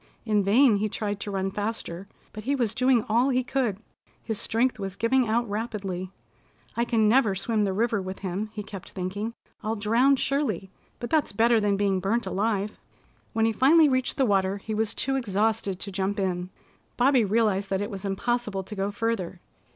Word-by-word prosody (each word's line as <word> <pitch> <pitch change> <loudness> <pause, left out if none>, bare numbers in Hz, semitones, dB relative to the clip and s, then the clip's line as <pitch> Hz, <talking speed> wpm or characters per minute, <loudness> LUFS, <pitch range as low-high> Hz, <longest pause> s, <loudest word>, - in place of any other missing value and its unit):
In 210 -2 +2
vain 220 +3 +5
he 215 +1 -1
tried 205 -1 -3
to 205 - -4
run 195 -1 -1
faster, 205 -3 -4 0.3
but 215 0 -8
he 280 +2 +1
was 235 -5 0
doing 255 -1 +3
all 235 +5 +3
he 255 -1 +1
could. 250 -6 -1 0.5
His 220 -2 -3
strength 235 +1 0
was 195 -1 -4
giving 245 +3 +2
out 235 +2 +1
rapidly. 200 -4 -4 0.7
"I 235 - +1
can 225 -3 +2
never 220 -3 +4
swim 210 +2 0
the 195 - 0
river 225 +1 0
with 190 0 -6
him," 195 +4 -2
he 215 -1 -6
kept 195 -1 -9
thinking. 205 +5 -4 0.3
"I'll 220 +1 -2
drown 230 +6 +3
surely, 255 - -1 0.3
but 240 - -6
that's 310 -8 +1
better 230 +2 +4
than 205 -1 +1
being 195 -2 +1
burnt 205 +5 0
alive." 205 +1 -1 0.5
When 225 -1 +2
he 225 - +3
finally 300 +8 +5
reached 255 -1 0
the 270 - +3
water 195 -2 +1
he 215 +2 -6
was 220 0 -1
too 270 0 0
exhausted 210 -4 0
to 200 - -5
jump 195 +1 -1
in. 180 -2 -1 0.5
Bobby 255 -1 +4
realized 205 -2 +1
that 190 - 0
it 205 +3 -3
was 195 -1 -6
impossible 205 0 -1
to 210 +3 -8
go 195 0 -1
further. 205 -4 -2
215 Hz, 190 wpm, -26 LUFS, 195-235 Hz, 0.7 s, vain